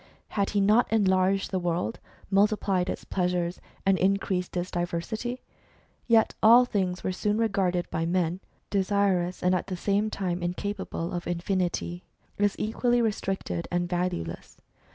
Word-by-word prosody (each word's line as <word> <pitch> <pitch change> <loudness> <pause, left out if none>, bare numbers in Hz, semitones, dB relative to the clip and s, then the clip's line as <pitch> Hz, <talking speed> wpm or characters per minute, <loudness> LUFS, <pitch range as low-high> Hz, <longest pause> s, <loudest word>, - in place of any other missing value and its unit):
Had 200 -2 0
he 205 - +1
not 215 +5 +4
enlarged 195 -2 +2
the 190 - 0
world, 175 +5 -2 0.3
multiplied 195 -2 +2
its - - -4
pleasures, 180 -1 -1 0.2
and 195 -1 +3
increased 190 -1 0
its 175 +1 -2
diversity? 175 +8 -3 0.6
Yet 225 -2 +4
all 235 +3 +8
things 190 -6 -1
were - - 0
soon 210 +3 0
regarded 195 -5 +1
by 165 +1 -1
men 175 0 0 0.3
(desirous 195 -2 +1
and 180 +1 +3
at 180 - -1
the 185 - -4
same 205 +3 +1
time 180 -4 -2
incapable 175 -1 -3
of 175 -1 -4
infinity) 175 0 -2 0.4
as 205 -1 +2
equally 240 +3 +1
restricted 195 - -2
and 175 0 0
valueless. 175 - -3
185 Hz, 140 wpm, -27 LUFS, 175-205 Hz, 0.6 s, all